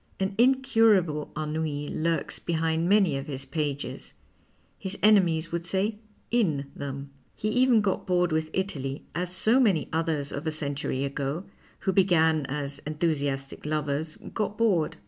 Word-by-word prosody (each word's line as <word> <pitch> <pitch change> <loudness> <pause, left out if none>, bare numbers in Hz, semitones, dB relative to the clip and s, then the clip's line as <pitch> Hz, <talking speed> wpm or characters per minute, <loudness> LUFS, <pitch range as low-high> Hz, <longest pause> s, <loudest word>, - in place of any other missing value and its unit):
An 190 +1 0
incurable 225 - +3
ennui 150 -1 -2
lurks 165 +2 -1
behind 165 0 0
many 195 -8 +4
of 135 +2 -5
his 135 -2 -5
pages; 145 -3 -4 0.6
his 190 +1 -4
enemies 175 -6 +4
would 170 0 -2
say 195 +4 -1 0.3
in 155 -13 +1
them. 140 0 -6 0.2
He 215 - -2
even 250 -1 +4
got 195 -2 -1
bored 180 -2 +2
with 155 0 0
Italy, 145 -8 -3
as 180 +1 -2
so 220 +7 +3
many 195 - +2
others 160 -3 0
of 150 +3 -4
a - - +1
century 140 -3 -2
ago, 140 +4 -3 0.4
who 190 - 0
began 160 -6 +3
as 140 0 -3
enthusiastic 145 -3 -2
lovers, 150 +1 -2 0.2
got 210 -1 -2
bored. 200 -9 +2
160 Hz, 145 wpm, -27 LUFS, 145-190 Hz, 0.6 s, many